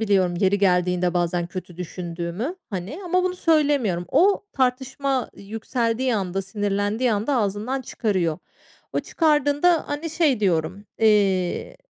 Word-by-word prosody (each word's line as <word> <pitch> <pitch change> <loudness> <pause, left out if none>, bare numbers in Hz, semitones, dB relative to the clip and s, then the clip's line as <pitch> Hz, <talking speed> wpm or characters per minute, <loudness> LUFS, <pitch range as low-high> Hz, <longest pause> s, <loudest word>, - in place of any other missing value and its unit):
biliyorum 190 -5 +2
yeri 200 +1 +3
geldiğinde 180 -2 +2
bazen 175 0 0
kötü 180 -1 -8
düşündüğümü, 175 - -4 0.2
hani, 195 - -5
ama 365 +1 +1
bunu 365 0 -1
söylemiyorum. 285 - +2
O 395 +3 +3
tartışma 265 0 0
yükseldiği 230 +4 -1
anda, 195 -1 -2
sinirlendiği 205 +4 0
anda 220 +7 0
ağzından 215 +5 -1
çıkarıyor. 185 -10 -1 0.5
O - - 0
çıkardığında, 305 +1 +2
hani, 300 +3 -3
şey 300 -8 +2
diyorum, 185 +1 0
eee, 200 -5 +2
210 Hz, 120 wpm, -23 LUFS, 185-270 Hz, 0.5 s, yeri